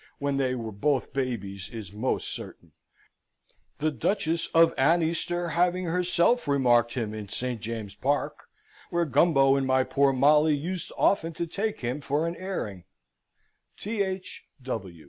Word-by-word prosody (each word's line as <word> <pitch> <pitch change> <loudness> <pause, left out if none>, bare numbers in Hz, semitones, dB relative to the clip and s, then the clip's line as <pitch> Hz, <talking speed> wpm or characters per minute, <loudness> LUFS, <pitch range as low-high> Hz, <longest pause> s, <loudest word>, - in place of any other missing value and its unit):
when 140 -1 -1
they 130 -2 +1
were 115 -3 -5
both 135 +6 -1
babies, 100 -8 -3
is 105 -5 -8
most 110 +5 -1
certain, - - -8 1.1
the 155 +1 0
Duchess 165 - -1
of 165 0 +5
Aneaster 170 +3 +1
having 180 +1 +1
herself 180 +6 +1
remarked 120 -4 +3
him 110 -4 -2
in 105 -2 -7
St. 125 0 -3
James's 110 -3 -5
Park, 145 +2 -1 0.4
where 170 -2 +1
Gumbo 135 -1 +4
and 135 -1 0
my 130 0 +3
poor 140 +1 +2
Molly 150 +3 +4
used 175 +5 -4
often 165 -4 +2
to 170 +2 -3
take 205 +6 -3
him 125 +4 -3
for 145 +3 0
an 170 - -3
airing. 140 - -5 0.9
Th. 195 -3 -3
140 Hz, 140 wpm, -27 LUFS, 125-170 Hz, 1.1 s, of